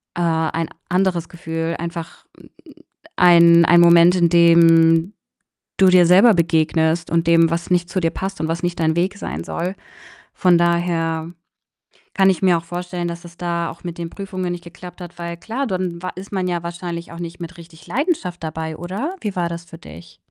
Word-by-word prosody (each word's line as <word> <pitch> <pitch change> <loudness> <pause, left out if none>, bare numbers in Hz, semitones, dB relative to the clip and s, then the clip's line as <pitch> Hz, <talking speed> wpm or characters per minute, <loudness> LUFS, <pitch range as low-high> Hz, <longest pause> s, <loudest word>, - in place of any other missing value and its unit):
äh, 175 - -3
ein 160 -1 -1 0.2
anderes 180 -2 0
Gefühl. 165 -1 -4
Einfach 170 0 -7
'n - - -17 0.7
ein 170 -1 +6
ein 175 +1 +5
Moment, 170 +1 +6
in 175 -2 +3
dem 165 +1 +4 0.7
du 190 - +5
dir 180 -1 +6
selber 195 +7 +6
begegnest 160 -1 +1
und 165 0 +1
dem, 165 -1 +4
was 170 +1 -3
nicht 175 -1 0
zu 185 +2 -1
dir 165 -2 0
passt 195 +1 -5
und 160 - -1
was 165 +2 -3
nicht 175 0 -2
dein 160 -1 +1
Weg 185 +4 -1
sein - - -6
soll. 180 +3 -4 0.6
Von 180 -2 +3
daher 170 -1 -1 0.8
kann 195 -1 +4
ich 185 - 0
mir 185 -3 +3
auch 165 - -6
vorstellen, 175 0 -5
dass 170 0 -7
es 170 0 -14
da 170 -1 -2
auch 170 - -12
mit 175 -2 -7
den 170 -1 -5
Prüfungen 185 -2 -5
nicht 175 -1 -6
geklappt 175 +2 -12
hat, 175 0 -11
weil 170 0 -6
klar, 240 +9 -4
dann 180 -4 -3
wa 185 - -4
ist 190 +3 -10
man 190 -2 -2
ja 175 -1 -3
wahrscheinlich 170 0 -6
auch 170 - -10
nicht 170 0 -7
mit 175 +1 -9
richtig 165 -1 -15
Leidenschaft 230 - -2
dabei, 160 0 -5
oder? 205 - -5
Wie 210 -3 -4
war 175 -2 -1
das 170 0 -7
für 165 0 -13
dich? 85 - -14
170 Hz, 195 wpm, -20 LUFS, 165-180 Hz, 0.8 s, ein